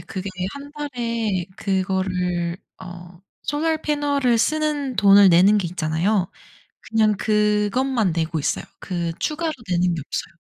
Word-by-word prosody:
그게 190 +1 -6 0.2
1 285 +1 -10
달에 235 - -2
그거를 185 -3 -1 0.3
어 175 -1 -11 0.3
solar 315 +2 0
panel을 285 -4 +1
쓰는 295 0 0
돈을 200 -1 +7
내는 185 +4 +5
게 185 -4 -2
있잖아요. 175 +4 0 0.6
그냥 220 -2 +2
그것만 210 +2 +1
내고 160 0 -1
있어요. 150 - -1 0.2
그 175 -3 -3
추가로 320 +1 -1 0.2
내는 180 -1 +1
게 160 - -4
없어요. - - -5
205 Hz, 285 characters per minute, -22 LUFS, 180-260 Hz, 0.6 s, 돈을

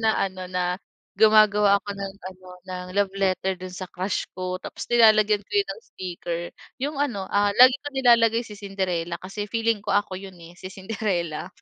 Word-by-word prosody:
na 220 -1 +2
ano, 185 -1 -2
na 180 -1 -1 0.4
gumagawa 210 -1 +5
ako 205 - -7
ng 195 -1 -5 0.2
ano, 185 0 -14 0.2
ng 180 0 -5
love 200 -1 +2
letter 190 -1 0
do'n 185 0 -8
sa 185 0 -6
crush 185 +3 -2
ko. 185 0 -3
Tapos - - -7
nilalagyan 215 -3 +5
ko - - -41
yun 405 0 +2
ng - - -13
sticker. 175 - -5 0.4
'Yong 290 +2 -2
ano, 220 -9 -2
ah, 205 0 +3
lagi 255 +1 +8
kong 290 -2 -7
nilalagay 235 -2 +4
si 215 - -10
Cinderella 185 -4 -3
kasi 200 +3 -5
feeling 230 -2 0
ko - - 0
ako 205 -2 -1
'yon, 190 -2 -11
eh, 170 0 -12
si 185 - -7
Cinderella. 190 -5 -3
195 Hz, 185 wpm, -24 LUFS, 185-220 Hz, 0.4 s, lagi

